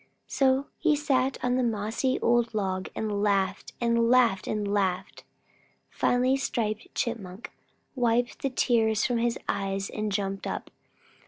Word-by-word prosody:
So 265 0 +2
he 315 -2 +3
sat 270 -2 +1
on 250 0 +2
the - - +2
mossy 230 +3 0
old 235 -1 +2
log 190 -2 -1
and 210 -2 -2
laughed 200 -1 0
and 235 -1 +2
laughed 240 -6 +4
and 210 -1 -1
laughed. 195 -3 -1 0.7
Finally 255 +2 +2
Striped 215 -5 -3
Chipmunk 210 -3 -4 0.4
wiped 240 -1 0
the 275 - 0
tears 225 -4 +2
from 245 -2 +1
his 235 0 0
eyes 195 0 -2
and 215 -1 -3
jumped 195 -1 -2
up. - - -5
230 Hz, 140 wpm, -27 LUFS, 200-250 Hz, 0.7 s, laughed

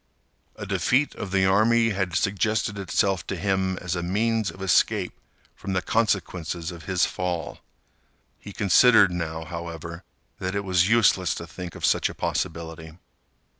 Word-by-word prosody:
A - - -7
defeat 140 +4 +1
of 105 - -6
the 95 0 +2
army 115 +4 +4
had 95 -3 -2
suggested 100 +2 0
itself 95 -1 0
to - - -3
him 95 -1 0
as 90 0 -3
a 90 - -2
means 110 +4 0
of - - -11
escape 95 -2 +2 0.4
from 95 - -5
the 90 - +1
consequences 90 -6 -1
of 85 -2 -11
his 95 -2 +2
fall. 90 -2 -4 0.8
He 100 - -10
considered, 105 +1 +5
now, 80 -2 -4
however, 85 -1 -7 0.4
that 95 +1 -3
it 100 - -1
was 95 -1 +2
useless 105 -5 +3
to 85 - -6
think 85 +1 -8
of - - -2
such - - +2
a - - -9
possibility. 80 -1 -4
95 Hz, 155 wpm, -25 LUFS, 85-100 Hz, 0.8 s, considered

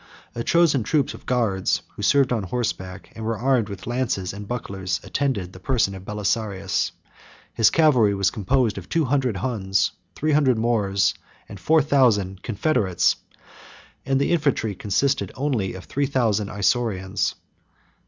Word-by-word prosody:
A 115 - -4
chosen 165 -5 +3
troop 140 +4 0
of - - -13
guards, 110 -7 +1
who - - -10
served 135 -3 +3
on 115 - 0
horseback, 95 -4 -4
and 110 - -7
were 110 0 -1
armed 120 -2 +1
with 100 -1 -8
lances 120 -7 -2
and 100 0 -8
bucklers, 95 -6 -3
attended 115 -10 -2
the 95 - -11
person 110 -2 +1
of 95 -1 -9
Belisarius; 105 -2 -1 0.6
his 115 - +5
cavalry 125 -11 +4
was 100 -1 +1
composed 115 0 0
of 90 - -13
two 165 -2 +1
hundred 130 -5 0
Huns, 95 -5 0 0.2
three 155 +1 0
hundred 140 -5 +3
Moors, 100 -5 +1 0.3
and 100 - -10
four 155 - +3
thousand 105 -10 +2
confederates, 105 - +1 0.9
and 135 0 +1
the 140 - +1
infantry 140 -10 +1
consisted 110 +9 0
of - - -17
only 125 -9 -1
three 135 +9 -2
thousand 110 -7 +1
Isaurians. 100 -2 0
110 Hz, 150 wpm, -23 LUFS, 100-135 Hz, 0.9 s, his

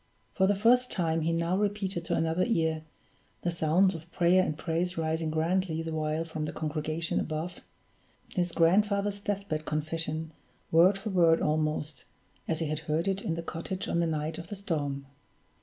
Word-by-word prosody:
For 190 - +3
the 205 - +3
first 245 +5 +4
time 165 -3 +1
he 165 +2 +1
now 170 +2 +1
repeated 195 -3 -1
to - - 0
another 165 +2 +1
ear 160 -8 +1 0.6
the 175 - +1
sounds 170 +4 +3
of 165 0 -9
prayer 175 +2 +4
and 155 - -2
praise 170 +2 -1
rising 160 0 0
grandly 165 +1 0
the 165 - -4
while 155 +1 -1
from 160 -2 -4
the - - -3
congregation 155 +1 -2
above 160 +3 -4 0.7
his 175 -2 +1
grandfather's 200 +4 +2
death 200 0 -3
bed 155 -2 -2
confession, 155 +1 -3 0.4
word 180 +5 +6
for 210 +2 -4
word 170 -3 +5
almost, 155 -3 -1 0.4
as 160 - 0
he 165 - -1
had 155 0 -2
heard 160 +4 +1
it 195 0 0
in 165 - -2
the 170 - -4
cottage 175 +3 -4
on 170 - 0
the 170 - +2
night 155 0 -2
of 170 - -8
the 205 - -5
storm. 145 -8 -2
165 Hz, 180 wpm, -29 LUFS, 155-185 Hz, 0.7 s, word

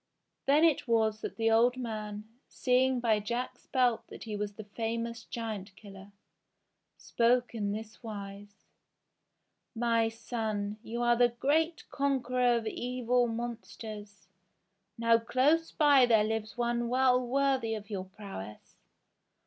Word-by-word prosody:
Then 290 +3 +5
it 320 -6 +3
was 220 -2 +2
that - - -5
the 225 0 +1
old 240 +3 +4
man, 215 -3 -5 0.2
seeing 255 0 +2
by 225 -3 +2
Jack's 235 +4 -4
belt 250 -3 +2
that - - -10
he 215 -2 -5
was 205 0 -3
the 220 - -8
famous 230 +2 -4
Giant 215 -4 -5
Killer, 200 -1 -13 0.9
spoke 245 +1 +1
in 205 -3 -2
this 220 +1 -7
wise: 205 -2 -9 1.1
"My 230 -1 +2
son! 215 -3 -3
You 235 +1 -4
are 240 0 +4
the 240 0 +4
great 310 +7 0
conqueror 255 -3 +1
of 230 - -4
evil 245 +1 0
mon 235 0 -3
sters. 210 -3 -10 0.7
Now 230 0 +4
close 285 +8 +2
by 285 -4 +5
there 220 -3 +5
lives 220 +1 -3
one 240 0 0
well 255 0 +3
worthy 260 -3 +1
of 210 0 -9
your 190 -2 -3
prowess. 190 - -10
230 Hz, 135 wpm, -30 LUFS, 215-250 Hz, 1.1 s, Then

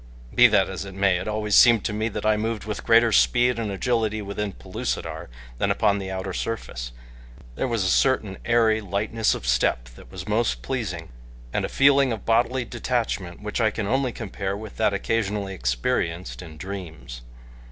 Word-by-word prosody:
Be - - +8
that - - +3
as - - -5
it 95 -1 -9
may, 95 -2 +3
it 90 - -5
always 105 -1 -2
seemed 115 -2 +6
to 105 - -1
me 110 +2 -1
that 110 - -5
I 110 0 +4
moved 110 0 -2
with 105 -1 -4
greater 115 0 +5
speed 115 - +3
and 110 -2 -2
agility 110 +1 0
within 100 0 -3
Pellucidar - - -5 0.3
than - - +1
upon 100 -1 +2
the 95 -1 -5
outer 95 0 -4
surface 60 - -4 0.6
there 100 - -2
was 115 -5 0
a - - 0
certain 105 -1 +2
airy 115 -2 +3
lightness 105 +3 0
of - - -7
step - - +1
that - - -16
was 95 0 -8
most 105 - 0
pleasing, - - -4 0.4
and - - 0
a - - -5
feeling 140 -1 +4
of 110 -4 -5
bodily 120 +2 +2
detachment 110 -7 -3
which 105 +3 -2
I 110 - +4
can 110 -1 -4
only 130 +3 +1
compare 100 -3 -4
with 110 -1 -9
that - - +2
occasionally 100 -1 -1
experienced 85 +7 -2
in 80 -3 -11
dreams. 80 -9 -7
105 Hz, 185 wpm, -24 LUFS, 95-115 Hz, 0.6 s, Be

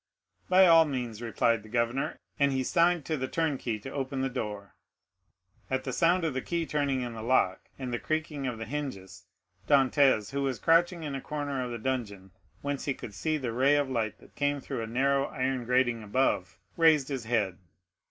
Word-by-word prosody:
"By 185 +1 +7
all 165 -2 +7
means," 125 -6 -4
replied 115 -1 +1
the 110 - -14
governor, 120 +4 -1 0.2
and 140 -1 +4
he 130 -1 0
signed 170 +2 +2
to 155 - -1
the 130 -1 -2
turnkey 135 -8 -1
to 135 - -7
open 135 -1 -3
the 135 - 0
door. 105 -5 -5 1.0
At 130 0 -1
the 130 - -4
sound 175 +2 +3
of 155 - -1
the 130 - -2
key 170 +2 -2
turning 140 -4 0
in 120 -1 -5
the 110 - -7
lock, 110 -6 +1
and 130 -2 -5
the 120 - -1
creaking 155 -3 -2
of 120 -3 -3
the 115 - -5
hinges, 130 -8 -6 0.4
Dantès, 135 -5 +4
who 140 0 -2
was 135 -3 -1
crouched 165 +2 +4
in 160 -5 -6
a 135 - -4
corner 145 -3 -3
of 125 - -4
the 120 - -4
dungeon, 110 -6 -4 0.3
whence 140 -1 -3
he 140 - -1
could 105 - -9
see 155 +8 -1
the 125 -5 -3
ray 135 +4 +4
of 145 -2 0
light 110 -4 -1
that - - -19
came 145 0 0
through 120 - -5
a 115 - -4
narrow 135 +4 +2
iron 130 -1 -2
grating 120 -1 +2
above, 105 -3 0 0.2
raised 155 -4 +4
his 135 -5 -4
head. 105 -6 0
130 Hz, 200 wpm, -29 LUFS, 115-145 Hz, 1.0 s, By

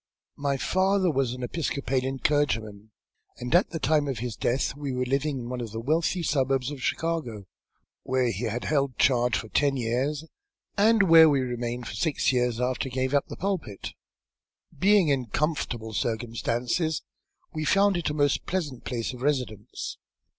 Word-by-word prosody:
"My 140 -1 0
father 185 +4 +2
was 135 -4 0
an 125 0 -7
Episcopalian 135 -2 -1
clergyman, 110 -8 0 0.5
and, 125 +3 -4
at 175 +3 +5
the 165 - -4
time 150 0 +2
of 135 -4 -2
his 120 0 -4
death, 130 +3 0
we 145 -2 -4
were 125 0 -1
living 135 +2 0
in 120 -2 -6
one 125 -1 -4
of 115 - -5
the 110 - -4
wealthy 160 +7 0
suburbs 135 -3 +1
of 140 -3 -7
Chicago, 130 -11 -2 0.6
where 130 -2 +1
he 110 +5 -3
had 115 +2 -2
held 140 -3 +1
a - - -41
charge 125 -2 +3
for 110 - -6
ten 140 +2 +2
years, 130 +6 -1 0.5
and 215 +1 +5
where 165 -3 +8
we 140 -2 +2
remained 120 -1 -3
for - - -6
six 155 -4 +1
years 125 -2 +1
after 125 +1 -1
he 125 - -10
gave 130 +1 0
up 140 - +2
the - - -8
pulpit. 175 - -3 0.8
Being 195 -3 +4
in 130 -4 +1
comfortable 120 -5 -2
circumstances, 120 +7 -1 0.5
we 155 -1 -3
found 200 +3 +3
it 175 -3 -1
a 150 - -3
most 145 -2 +1
pleasant 155 -9 -3
place 120 0 -3
of 125 - -10
residence. 125 -7 -2
135 Hz, 175 wpm, -27 LUFS, 120-155 Hz, 0.8 s, where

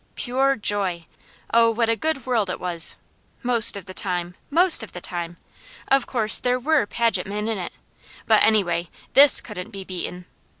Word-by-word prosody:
Pure 265 +2 -1
joy! 195 -6 -2 0.5
Oh 230 0 +4
what 230 0 -1
a 230 - +1
good 310 0 -4
world 230 -6 -1
it - - -5
was! 170 -2 0 0.5
most 235 -4 +3
of 195 - -10
the 185 - -11
time! 180 -2 -3 0.2
Most 345 +3 +6
of 225 - -7
the 175 - -8
time! 175 -1 -6 0.5
Of 270 0 +1
course, 220 -4 +4
there 250 0 -1
WERE 290 -3 0
Paget 230 -3 -1
men 210 +2 -5
in 220 -3 -3
it. 180 - -7 0.5
But - - +3
anyway, 175 -6 0 0.2
THIS 280 0 +8
couldn't 205 -2 -9
be 195 -3 -10
beaten. 180 -1 -8
215 Hz, 175 wpm, -21 LUFS, 180-245 Hz, 0.5 s, THIS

